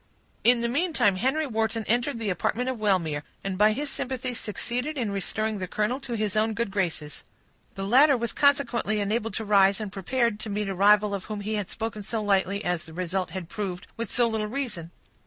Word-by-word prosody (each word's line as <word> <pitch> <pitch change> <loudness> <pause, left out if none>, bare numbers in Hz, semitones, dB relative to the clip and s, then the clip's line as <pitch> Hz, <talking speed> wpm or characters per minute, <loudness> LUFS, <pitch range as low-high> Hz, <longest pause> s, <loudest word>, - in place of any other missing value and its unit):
In 240 0 +6
the 235 - +1
meantime, 270 - +2
Henry 270 +9 +1
Wharton 225 -2 -1
entered 240 +3 +1
the 220 -3 -1
apartment 245 +8 -1
of 255 -3 -3
Wellmere, 175 -8 +1 0.2
and 195 -1 -2
by 210 +3 +5
his 290 +7 -2
sympathy 255 -1 -2
succeeded 245 - -3
in 230 -6 -1
restoring 215 +2 -2
the 185 - -3
colonel 215 +8 -1
to 265 -3 -6
his 215 -3 -1
own 220 +1 +2
good 230 -3 -1
graces. 165 -6 -2 0.5
The 195 - -4
latter 270 +6 +6
was 235 -1 -2
consequently 260 -7 +2
enabled 215 +2 -1
to 220 - -3
rise, 200 -1 +4
and 210 -3 -4
prepared 235 +3 0
to 215 - -6
meet 205 0 -2
a - - -1
rival 205 +2 +4
of 195 -2 -4
whom 210 -1 -5
he 215 +2 -3
had 205 -3 -2
spoken 220 -1 -4
so 220 +3 -3
lightly, 200 0 +1
and, 175 - +2
as 170 -1 -5
the 160 - -12
result 185 +2 -2
had 185 -3 -6
proved, 190 -1 -4
with 230 -3 -4
so 240 -1 +3
little 220 -2 -1
reason. 215 -9 -4
215 Hz, 210 wpm, -26 LUFS, 195-235 Hz, 0.5 s, In